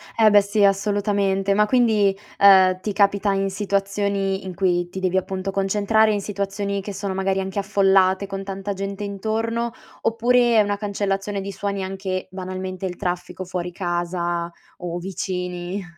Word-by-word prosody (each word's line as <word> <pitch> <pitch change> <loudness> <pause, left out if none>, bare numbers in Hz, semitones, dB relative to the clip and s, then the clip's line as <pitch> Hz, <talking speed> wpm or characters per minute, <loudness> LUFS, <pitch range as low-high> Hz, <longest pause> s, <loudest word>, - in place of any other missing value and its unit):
Eh 220 -1 +6
beh 205 -1 +6
sì, 205 +1 0
assolutamente. 200 -1 +1
Ma 210 0 +4
quindi, 215 -5 +3 0.2
uhm, 190 -2 +7
ti 210 - -3
capita 200 0 +2
in 195 0 0
situazioni 195 0 -1
in 185 - -5
cui 175 -2 +1
ti 190 - -6
devi 185 0 0
appunto 190 +1 -2
concentrare, 210 +3 +2
in 205 - -1
situazioni 200 0 -3
che 205 - -6
sono 195 0 -3
magari 190 0 0
anche 190 +1 -4
affollate, 195 -1 +3
con 195 0 -5
tanta 195 +1 -4
gente 195 +1 -5
intorno? 225 +4 -2 0.3
Oppure 235 +1 +3
è - - +7
una 205 0 0
cancellazione 200 -1 -2
di 200 +1 -5
suoni, 200 -1 -3
anche 190 -1 -4
banalmente 185 0 -5
il 180 -1 -3
traffico 180 +1 -4
fuori 180 -1 -4
casa 175 -1 -2 0.3
o 175 -1 -4
vicini? 180 0 -4
195 Hz, 160 wpm, -22 LUFS, 190-205 Hz, 0.3 s, uhm